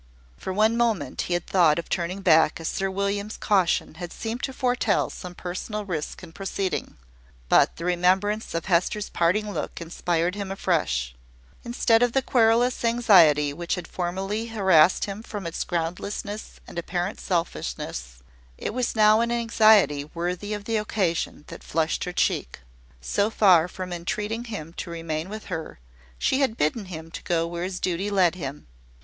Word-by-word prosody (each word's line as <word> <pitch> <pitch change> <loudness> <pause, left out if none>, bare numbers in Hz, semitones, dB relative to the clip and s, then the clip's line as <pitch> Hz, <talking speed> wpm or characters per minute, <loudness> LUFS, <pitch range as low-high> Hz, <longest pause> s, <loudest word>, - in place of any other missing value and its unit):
For 190 - -5
one 215 +4 +3
moment 220 - 0
he 175 - +2
had 175 - -2
thought 170 -5 +4
of 170 - -4
turning 180 +2 -2
back, 160 -4 +4
as 165 - -4
Sir 195 0 -1
William's 200 +2 -2
caution 190 -8 +1
had 175 -1 -5
seemed 230 +2 -5
to 270 - -2
foretell 245 -5 +1
some 180 -1 -8
personal 205 +4 -5
risk 170 -2 -4
in 170 - -10
proceeding; 195 +1 -3 0.5
but - - +4
the 170 - -6
remembrance 185 +4 +1
of 165 - -2
Hester's 190 +3 +1
parting 205 +5 +1
look - - -4
inspired 170 +1 -1
him 200 -1 -5
afresh. 70 - 0 0.5
Instead 235 -1 +2
of 245 -1 +2
the 270 - +2
querulous 240 +1 +3
anxiety 180 -12 +5
which 170 +3 -2
had 180 - -7
formerly 195 +5 -3
harassed 190 -7 +4
him 200 +1 -6
from 205 -4 -7
its 165 - -3
groundlessness 185 +5 -4
and 170 - -6
apparent 175 +3 -3
selfishness, 60 - -3 0.3
it - - -4
was 250 0 -1
now 215 0 +5
an 235 0 0
anxiety 215 -10 +4
worthy 180 +5 -2
of 205 - -7
the 225 0 0
occasion 190 -8 -1
that - - -10
flushed 160 0 -1
her 180 - -3
cheek. 60 - -1 0.4
So 200 - +1
far 185 -7 +5
from 185 0 -6
entreating 210 +7 -3
him 185 -9 -7
to - - -5
remain 165 0 -4
with 215 +1 -6
her, 160 -2 -5 0.4
she 265 - +1
had 260 -5 +1
bidden 155 +9 0
him 165 -3 -8
go 165 -1 +1
where 170 +1 -4
his 185 -1 -4
duty 185 +3 -1
led 185 -4 +3
him. 145 -5 -6
185 Hz, 165 wpm, -25 LUFS, 170-215 Hz, 0.5 s, anxiety